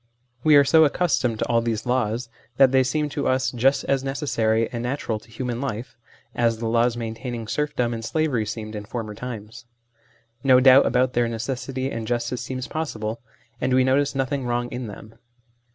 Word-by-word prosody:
We 155 -1 +6
are 145 - +8
so 160 +3 +5
accustomed 145 -7 +1
to - - -1
all 115 -1 +2
these 115 -1 -2
laws, 120 -1 0 0.3
that 135 -2 +6
they 130 0 +5
seem 150 +4 0
to 145 0 -2
us 130 -1 +1
just 130 +3 +2
as 135 -1 0
necessary 115 -5 0
and 120 -2 -4
natural 120 -3 -2
to 115 - -21
human 120 +1 -4
life, 120 -3 -4 0.4
as 115 -1 +1
the 115 - -5
laws 115 +1 +2
maintaining 115 0 -5
serfdom 125 -3 -1
and 115 0 -5
slavery 130 -5 0
seemed 110 -1 -5
in 105 -1 -6
former 110 -1 -5
times; 115 +1 -8 0.8
no 130 -2 +6
doubt 130 +1 +7
about 125 +1 +2
their 120 -1 +2
necessity 130 +3 -3
and 115 -1 -4
justice 120 +1 -2
seems 130 +1 -5
possible, 115 -8 -4 0.4
and 130 0 +2
we 130 - +5
notice 140 +2 +2
nothing 135 0 -1
wrong 120 0 -1
in 125 -1 -5
them. 110 +1 -11
125 Hz, 185 wpm, -23 LUFS, 115-135 Hz, 0.8 s, are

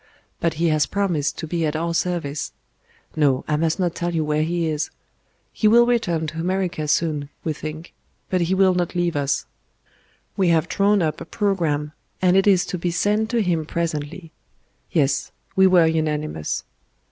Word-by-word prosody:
But 170 -1 0
He 165 +1 +1
has 155 -2 +2
promised 180 -8 -1
to - - -4
be 165 +1 -2
at 155 -1 0
our 170 +1 -1
service.... 165 -5 -2 0.6
No, 140 -4 +2
I 150 - +1
must 160 +3 0
not 175 -3 +1
tell 175 -1 -2
you 160 -1 +1
where 150 0 +1
He 170 +1 0
is.... 155 -1 -1 0.6
He 215 - +2
will 235 +2 +6
return 210 -10 +1
to 155 +1 -5
America 180 -3 -1
soon, 150 -2 0
we 160 - -1
think; 155 +3 -7 0.3
but 185 -1 0
He 175 +3 +1
will 190 -1 +4
not 180 0 -1
leave 175 -2 0
us. 140 -1 0 0.9
We 190 - +2
have 165 -1 +3
drawn 200 0 +2
up 155 -1 -2
a - - -6
programme, 165 -9 -1 0.3
and 185 0 +3
it 195 +1 +4
is 190 -2 +4
to 180 - -2
be 175 - -1
sent 210 +5 +1
to 235 -2 +1
Him 170 -4 0
presently.... 160 +1 -4 0.6
Yes, 140 -4 +1 0.2
we 190 0 +6
were 180 -3 +5
unanimous." 155 - -1
165 Hz, 180 wpm, -22 LUFS, 155-185 Hz, 0.9 s, will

